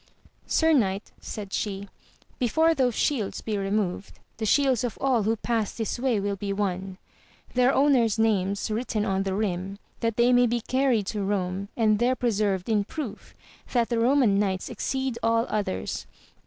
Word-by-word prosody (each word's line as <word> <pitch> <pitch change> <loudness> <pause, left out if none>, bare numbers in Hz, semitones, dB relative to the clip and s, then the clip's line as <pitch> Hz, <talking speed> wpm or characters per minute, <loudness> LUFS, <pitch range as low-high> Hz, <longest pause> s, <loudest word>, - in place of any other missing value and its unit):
Sir 320 0 +3
knight, 200 -7 +1
said 200 -2 -7
she, 200 -1 -3 0.5
be 250 - +2
fore 320 +7 +3
those 255 -6 +1
shields 240 -10 -1
be 220 - -3
removed, 195 -1 -2 0.2
the 220 -1 -2
shields 265 -1 +3
of 245 - -3
all 260 -4 +2
who 220 +2 +1
pass 225 -2 -1
this 225 +1 -3
way 245 -4 +1
will 200 0 -1
be 200 +1 -4
won, 190 -2 -2 0.6
their 250 +1 +4
owner's 265 -7 +3
names 200 -1 +1
written 215 -1 -1
on 195 0 0
the 195 -1 -1
rim, 195 -1 -2 0.2
that 230 -2 -1
they 240 +1 +4
may 245 0 +5
be 240 +1 0
carried 255 -4 +1
to 210 +2 -3
Eome 195 -1 -1
and 215 -2 +3
there 250 +2 +2
preserved 205 -6 0
in 215 -3 +2
proof 240 -1 -7 0.4
that 240 -2 +2
the 235 - 0
Eoman 235 -3 +3
knights 190 -2 -1
ex - - -3
ceed 265 -3 -1
all 230 +1 +2
others. 200 - -3
220 Hz, 175 wpm, -26 LUFS, 200-245 Hz, 0.6 s, may